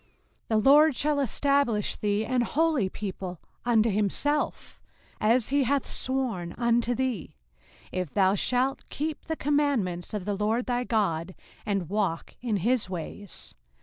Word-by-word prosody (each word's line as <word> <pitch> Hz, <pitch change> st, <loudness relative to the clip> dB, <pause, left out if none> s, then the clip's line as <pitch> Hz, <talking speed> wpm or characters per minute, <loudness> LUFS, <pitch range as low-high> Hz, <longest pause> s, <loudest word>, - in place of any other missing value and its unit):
05:028:009 -, -, -33 dB, 0.4 s
The 220 Hz, -, +2 dB
LORD 300 Hz, 0 st, +6 dB
shall 295 Hz, +3 st, +1 dB
establish 275 Hz, -4 st, +1 dB
thee 210 Hz, +1 st, 0 dB
an 255 Hz, +1 st, +1 dB
holy 290 Hz, -4 st, +1 dB
people 185 Hz, -3 st, -6 dB, 0.3 s
unto 230 Hz, -2 st, +3 dB
himself, 215 Hz, +9 st, -1 dB, 0.4 s
as 225 Hz, +2 st, +3 dB
he 280 Hz, 0 st, +3 dB
hath 275 Hz, +1 st, +1 dB
sworn 240 Hz, -10 st, -2 dB
unto 235 Hz, 0 st, +2 dB
thee, 255 Hz, -, -2 dB, 0.6 s
if 180 Hz, -5 st, -3 dB
thou 190 Hz, -1 st, +3 dB
shalt 255 Hz, +6 st, 0 dB
keep 305 Hz, +1 st, -4 dB
the 320 Hz, -, -2 dB
commandments 275 Hz, -, 0 dB
of 200 Hz, -3 st, -4 dB
the 205 Hz, -1 st, -1 dB
LORD 220 Hz, +4 st, 0 dB
thy 245 Hz, 0 st, 0 dB
God, 185 Hz, -6 st, 0 dB, 0.3 s
and 195 Hz, -4 st, 0 dB
walk 195 Hz, -3 st, -1 dB
in 230 Hz, -4 st, 0 dB
his 245 Hz, -5 st, +2 dB
ways. 185 Hz, +2 st, -6 dB
230 Hz, 145 wpm, -27 LUFS, 200-265 Hz, 0.6 s, LORD